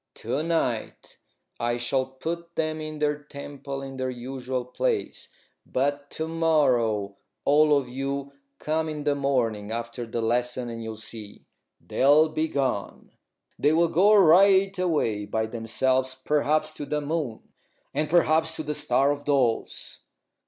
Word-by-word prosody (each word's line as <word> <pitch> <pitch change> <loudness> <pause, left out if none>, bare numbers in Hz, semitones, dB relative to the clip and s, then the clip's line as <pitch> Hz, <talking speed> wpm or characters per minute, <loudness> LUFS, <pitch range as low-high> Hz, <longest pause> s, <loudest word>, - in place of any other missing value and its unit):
To 145 - -2
night 160 -9 -2 0.4
I 120 0 0
shall 130 +2 0
put 170 +6 -6
them 155 -1 -1
in 155 0 -6
their 150 0 0
temple 140 -1 -7
in 135 -1 -7
their 130 0 -2
usual 125 0 -4
place. 430 - -2 0.4
But 145 +2 -1
to 160 - -2
morrow 125 -11 +1 0.3
all 150 +1 +5
of 135 -3 -2
you 135 +2 -4 0.3
come 160 +1 -1
in 150 -1 -5
the 145 0 +2
morning 120 -7 0
after 115 +1 -4
lessons, 120 +2 -1
and 115 0 -6
you'll 110 -1 -6
see 110 -2 -10 0.3
they'll 150 +4 +4
be 155 +1 -1
gone! 135 -9 -2 0.5
They 150 - +3
will 170 +1 +3
go 200 +7 +5
right 195 +2 +6
away 145 - 0
by 110 +2 -1
themselves, 130 +3 0
perhaps 155 +1 +1
to 145 - -7
the 150 - -1
moon 145 -6 -4 0.4
and 150 0 -1
perhaps 160 -1 +3
to 155 - -4
the 150 0 -2
Star 135 0 +2
of 145 0 -4
Dolls." 130 -6 0
140 Hz, 145 wpm, -26 LUFS, 125-155 Hz, 0.5 s, right